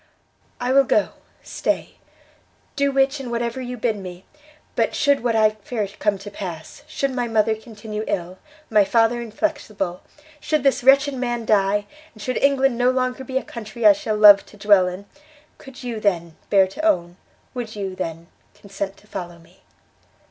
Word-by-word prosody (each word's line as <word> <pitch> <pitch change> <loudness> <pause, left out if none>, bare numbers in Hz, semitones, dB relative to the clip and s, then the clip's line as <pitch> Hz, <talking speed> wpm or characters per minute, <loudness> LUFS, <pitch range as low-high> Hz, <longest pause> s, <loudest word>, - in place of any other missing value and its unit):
"I 245 +1 -1
will 275 0 +6
go, 270 - +2 0.3
stay, - - -3 0.8
do 280 -1 +1
which 270 +1 +2
and 260 -3 -6
whatever 235 +1 -2
you 250 0 -5
bid 225 -2 -1
me: 185 -1 -9 0.5
but, - - 0
should 285 -4 +2
what 235 -2 +1
I 215 -1 +4
fear 215 0 -4
come 210 -2 +1
to 200 +2 -10
pass, 175 -6 -8
should 275 -3 -2
my 245 -2 -1
mother 220 -1 +2
continue 215 -1 -7
ill, 180 +1 -3 0.3
my 210 -2 +6
father 230 +3 +2
inflexible, 215 - -3 0.4
should 305 -3 -1
this 275 -3 +2
wretched 275 +2 +5
man 240 -3 -3
die, 205 -1 +2 0.3
and 215 - -10
should 255 +4 -2
England 270 -3 +2
no 245 +1 +4
longer 255 0 -1
be 260 0 -3
a - - -1
country 225 0 -6
I 210 - +9
shall 215 +1 -3
love 205 -2 +8
to 210 - -16
dwell 205 -3 +4
in, 180 +3 -6 0.5
could 270 -2 -12
you, 235 -3 -4
then, 170 -6 -1
bear 195 -2 +5
to 195 +12 -8
own, 175 - +1 0.4
would 240 -4 -6
you, 195 -2 -4
then, 165 -2 -5 0.3
consent 195 -1 -6
to - - -21
follow 175 -4 -7
me?" 165 - -22
220 Hz, 175 wpm, -22 LUFS, 200-255 Hz, 0.8 s, I